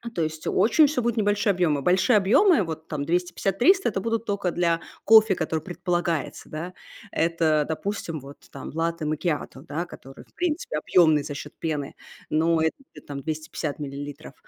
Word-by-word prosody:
То 170 Hz, -, 0 dB
есть 155 Hz, 0 st, -4 dB
очень 235 Hz, -, +4 dB
всё 275 Hz, -3 st, -1 dB
будет 235 Hz, 0 st, -1 dB
небольшие 205 Hz, 0 st, +2 dB
объёмы. 165 Hz, -6 st, +1 dB
Большие 190 Hz, -, +4 dB
объёмы, 225 Hz, -, +4 dB
вот 160 Hz, -2 st, -6 dB
там 145 Hz, -2 st, -3 dB
250-300,- 195 Hz, -, +2 dB
это 195 Hz, -2 st, -3 dB
будут 230 Hz, 0 st, -1 dB
тока 200 Hz, -4 st, -1 dB
для 170 Hz, -1 st, +1 dB, 0.2 s
кофе, 220 Hz, -2 st, +7 dB
который 160 Hz, -2 st, -2 dB
предполагается, 175 Hz, -3 st, -2 dB
да. 170 Hz, +4 st, -6 dB, 0.4 s
Это, 160 Hz, -2 st, +2 dB
допустим, 165 Hz, -1 st, -3 dB
вот 140 Hz, +2 st, -12 dB
там 135 Hz, -, -8 dB
латте 165 Hz, 0 st, -2 dB
макиато, 150 Hz, -3 st, -2 dB
да, 160 Hz, +3 st, -4 dB
который, 135 Hz, -5 st, -12 dB
в -, -, -32 dB
принципе, 340 Hz, -, -2 dB
объёмный 155 Hz, -2 st, +4 dB
за 145 Hz, -, -5 dB
счёт 150 Hz, +1 st, -8 dB
пены, 150 Hz, -4 st, -3 dB, 0.3 s
но 160 Hz, +1 st, +2 dB
это 160 Hz, 0 st, +1 dB, 0.2 s
будет -, -, -14 dB
там 140 Hz, -1 st, -5 dB
250 155 Hz, 0 st, -4 dB
миллилитров, 145 Hz, 0 st, -7 dB
165 Hz, 165 wpm, -25 LUFS, 155-195 Hz, 0.4 s, кофе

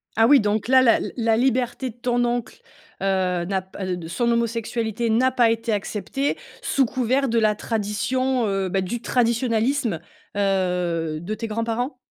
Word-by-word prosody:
Ah 225 Hz, +1 st, +5 dB
oui, 285 Hz, 0 st, +7 dB
donc 210 Hz, +1 st, 0 dB
là, 260 Hz, 0 st, +6 dB
la 235 Hz, -3 st, +5 dB, 0.2 s
la 225 Hz, -1 st, +2 dB
liberté 255 Hz, 0 st, 0 dB
de 220 Hz, -, -21 dB
ton 245 Hz, 0 st, 0 dB
oncle, 240 Hz, -1 st, -3 dB, 0.4 s
heu, 185 Hz, -3 st, 0 dB
n'a 190 Hz, 0 st, -1 dB
p 185 Hz, -1 st, -5 dB
de 165 Hz, -2 st, -8 dB
son 235 Hz, +8 st, 0 dB
homosexualité 230 Hz, -1 st, -1 dB
n'a 255 Hz, +4 st, +3 dB
pas 240 Hz, -3 st, +3 dB
été 230 Hz, 0 st, -2 dB
accepté, 210 Hz, +7 st, -2 dB, 0.2 s
sous 275 Hz, -, +2 dB
couvert 260 Hz, +3 st, 0 dB
de 230 Hz, -, +1 dB
la 215 Hz, -1 st, +3 dB
tradition, 230 Hz, +4 st, -1 dB
heu, 195 Hz, -1 st, -1 dB
bah, 190 Hz, +1 st, 0 dB
du 230 Hz, +6 st, -4 dB
traditionalisme, 235 Hz, -, +1 dB, 0.4 s
heu, 180 Hz, -5 st, 0 dB
de 180 Hz, +7 st, -4 dB
tes 225 Hz, +1 st, -5 dB
grands-parents? 230 Hz, +4 st, -2 dB
225 Hz, 165 wpm, -23 LUFS, 195-245 Hz, 0.4 s, oui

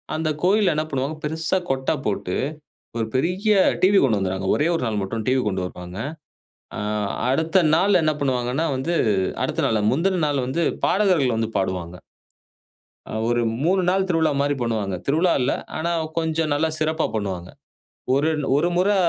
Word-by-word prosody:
அந்த 155 Hz, 0 st, -1 dB
கோவில்ல 195 Hz, -2 st, +3 dB
என்ன 155 Hz, +1 st, 0 dB
பண்ணுவாங்க? 135 Hz, +3 st, -2 dB
பெருசா 160 Hz, +4 st, 0 dB
கொட்டை 130 Hz, 0 st, 0 dB
போட்டு 100 Hz, -3 st, -2 dB, 0.6 s
ஒரு 115 Hz, -, 0 dB
பெரிய 185 Hz, -, +1 dB, 0.3 s
டிவி 195 Hz, +2 st, +5 dB
கொண்டு 115 Hz, -6 st, +2 dB
வந்துடுவாங்க. 95 Hz, 0 st, -2 dB
ஒரே 150 Hz, +3 st, +1 dB
1 145 Hz, -, -2 dB
நாள் 105 Hz, -2 st, -1 dB
மட்டும் 110 Hz, +3 st, -4 dB
டிவி 130 Hz, 0 st, +3 dB
கொண்டு 95 Hz, -2 st, -1 dB
வருவாங்க. 90 Hz, +2 st, -8 dB, 0.8 s
ஆ, -, -, -3 dB, 0.5 s
அடுத்த 160 Hz, +6 st, +2 dB
நாள் 190 Hz, +1 st, +4 dB
என்ன 155 Hz, 0 st, +2 dB
பண்ணுவாங்கன்னா, 130 Hz, +2 st, 0 dB
வந்து 160 Hz, +7 st, -2 dB, 0.5 s
அடுத்த -, -, -1 dB
நாள் 110 Hz, -1 st, +1 dB
முந்தின 180 Hz, +5 st, +1 dB
நாள் 140 Hz, -3 st, 0 dB
வந்து 165 Hz, +6 st, 0 dB, 0.2 s
பாடகர்கள் 180 Hz, -, +2 dB
வந்து 115 Hz, -1 st, -1 dB
பாடுவாங்க. 90 Hz, -2 st, -2 dB, 1.1 s
அ -, -, -9 dB, 0.2 s
ஒரு 120 Hz, 0 st, +1 dB, 0.2 s
3 185 Hz, +3 st, +3 dB
நாள் 190 Hz, +1 st, +2 dB
திருவிழா 160 Hz, -3 st, +2 dB
மாரி 145 Hz, 0 st, +1 dB
பண்ணுவாங்க. 110 Hz, -5 st, -1 dB
திருவிழா 165 Hz, +5 st, +2 dB
இல்ல 125 Hz, -, +1 dB, 0.3 s
ஆனா 170 Hz, +2 st, -1 dB, 0.3 s
கொஞ்சம் 160 Hz, -1 st, 0 dB
நல்லா 160 Hz, +2 st, +1 dB
சிறப்பா 155 Hz, +1 st, 0 dB
பண்ணுவாங்க. 95 Hz, -4 st, -3 dB, 0.7 s
ஒரு 145 Hz, +3 st, +2 dB, 0.3 s
ஒரு 170 Hz, +4 st, +2 dB
முறை 200 Hz, +3 st, +3 dB
145 Hz, 155 wpm, -22 LUFS, 110-165 Hz, 1.1 s, டிவி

